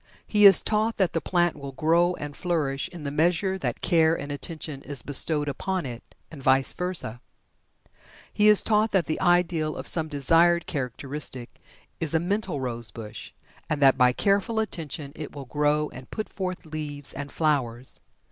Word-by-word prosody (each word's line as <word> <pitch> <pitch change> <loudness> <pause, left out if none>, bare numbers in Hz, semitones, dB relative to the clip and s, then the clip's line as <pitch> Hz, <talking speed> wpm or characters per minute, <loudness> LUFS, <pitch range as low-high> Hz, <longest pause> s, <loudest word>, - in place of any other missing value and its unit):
He 210 -1 +6
is 195 - +9
taught 220 +1 0
that 190 -3 +1
the 165 - -1
plant 175 +1 +1
will 140 -2 -8
grow 170 +4 +2
and 145 -2 -7
flourish 150 -6 -2
in 170 -4 -10
the 140 - -3
measure 175 +5 +1
that - - -3
care 165 -1 +3
and 145 +1 -6
attention 150 -1 -6
is 140 -1 -2
bestowed 145 +1 +1
upon 185 +5 -3
it 120 -2 -6 0.3
and 150 -4 -10
vice 130 0 +3
versa. 180 -10 -4 1.1
He 210 - +3
is 210 -1 +7
taught 215 0 +2
that 190 -3 +3
the 155 - -3
ideal 175 -3 +2
of - - -6
some 160 -2 0
desired 165 +4 +3
characteristic 135 -2 -4 0.4
is 165 -1 0
a - - +4
mental 190 -3 -2
rosebush, 115 -3 -6 0.4
and 155 - -1
that 135 -1 +6
by 125 -1 +4
careful 200 - 0
attention 160 -8 -5
it 150 -1 -8
will 140 -2 -7
grow 150 +2 0
and 130 0 -12
put 215 - -5
forth 185 -3 -5
leaves 150 -3 -5
and 145 +1 -7
flowers. 130 -6 -1
155 Hz, 170 wpm, -25 LUFS, 140-175 Hz, 1.1 s, is